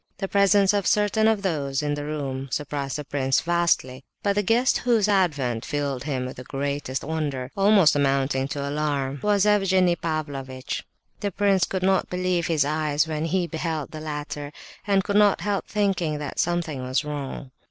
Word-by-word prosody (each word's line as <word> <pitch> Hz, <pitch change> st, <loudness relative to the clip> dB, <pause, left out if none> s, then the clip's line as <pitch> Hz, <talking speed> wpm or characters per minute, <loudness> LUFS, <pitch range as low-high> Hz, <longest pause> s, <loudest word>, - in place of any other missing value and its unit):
The 195 Hz, -, -3 dB
presence 200 Hz, 0 st, +4 dB
of 200 Hz, -2 st, 0 dB
certain 210 Hz, +1 st, +3 dB
of 220 Hz, -2 st, +2 dB
those 145 Hz, -6 st, -1 dB
in 145 Hz, 0 st, 0 dB
the 145 Hz, 0 st, -3 dB
room 135 Hz, -3 st, -4 dB
surprised 145 Hz, -1 st, -3 dB
the 150 Hz, -, -5 dB
prince 135 Hz, -1 st, +1 dB
vastly, 170 Hz, -7 st, 0 dB, 0.2 s
but 200 Hz, -, +2 dB
the 205 Hz, -, +1 dB
guest 230 Hz, +6 st, +2 dB
whose 230 Hz, -4 st, +2 dB
advent 145 Hz, -, +1 dB
filled 140 Hz, -3 st, -3 dB
him 130 Hz, -4 st, -2 dB
with 130 Hz, -, -7 dB
the 125 Hz, -, -7 dB
greatest 140 Hz, 0 st, -3 dB
wonder—almost 160 Hz, +5 st, +2 dB
amounting 135 Hz, -1 st, +1 dB
to 140 Hz, 0 st, -4 dB
alarm—was 145 Hz, +7 st, 0 dB
Evgenie 190 Hz, -4 st, +3 dB
Pavlovitch. 140 Hz, -5 st, -4 dB, 0.4 s
The 205 Hz, -, -1 dB
prince 200 Hz, -1 st, +2 dB
could 190 Hz, -1 st, -3 dB
not 190 Hz, 0 st, +2 dB
believe 180 Hz, -1 st, 0 dB
his 155 Hz, -4 st, +2 dB
eyes 150 Hz, 0 st, 0 dB
when 155 Hz, 0 st, -2 dB
he 175 Hz, +2 st, 0 dB
beheld 160 Hz, -3 st, -3 dB
the 155 Hz, -, -7 dB
latter, 150 Hz, -1 st, -5 dB, 0.4 s
and 195 Hz, -1 st, +3 dB
could 200 Hz, +1 st, 0 dB
not 205 Hz, -2 st, +4 dB
help 205 Hz, -1 st, -1 dB
thinking 190 Hz, -7 st, 0 dB
that 145 Hz, -2 st, -5 dB
something 170 Hz, -5 st, -1 dB
was 130 Hz, +4 st, -1 dB
wrong. 140 Hz, -2 st, -5 dB
155 Hz, 170 wpm, -24 LUFS, 140-195 Hz, 0.4 s, presence